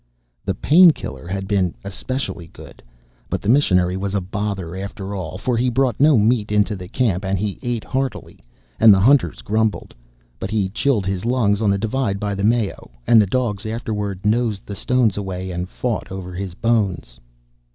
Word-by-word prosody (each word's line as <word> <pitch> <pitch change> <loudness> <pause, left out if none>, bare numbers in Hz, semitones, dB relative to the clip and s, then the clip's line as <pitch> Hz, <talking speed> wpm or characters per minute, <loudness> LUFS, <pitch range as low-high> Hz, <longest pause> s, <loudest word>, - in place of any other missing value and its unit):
The - - -1
"painkiller" 155 - +4
had 95 +1 -4
been 95 -5 0
especially 100 -3 -4
good. - - -14 0.5
But - - -1
the 100 - -4
missionary 90 -9 +3
was 100 +1 -3
a - - +2
bother 95 -2 -4
after 100 +1 -6
all, 90 -3 -5
for 125 +5 -1
he 125 +2 +2
brought 125 -2 0
no 145 -1 +5
meat 110 0 +2
into 105 0 +2
the 90 -2 -8
camp, 105 -3 0
and 95 0 -1
he 100 +1 -3
ate 120 -2 -2
heartily, 130 -5 -4 0.4
and 110 -1 +8
the 95 - +6
hunters 130 +6 +3
grumbled. 110 0 -1 0.5
But 95 - -4
he 105 -3 0
chilled 110 0 0
his 95 -1 -2
lungs 115 -4 +1
on 105 - +2
the 100 - +2
divide 110 -1 -1
by 105 0 -2
the 100 0 -3
Mayo, 110 -1 0 0.2
and 115 -2 +6
the 105 - +1
dogs 110 -2 -1
afterwards 105 -4 -4
nosed 110 -2 0
the 100 - -6
stones 120 -1 +1
away 95 -2 -4
and 90 +1 -4
fought 120 -2 -3
over 95 -1 -6
his 90 -1 -5
bones. 95 - -1
105 Hz, 185 wpm, -21 LUFS, 95-115 Hz, 0.5 s, and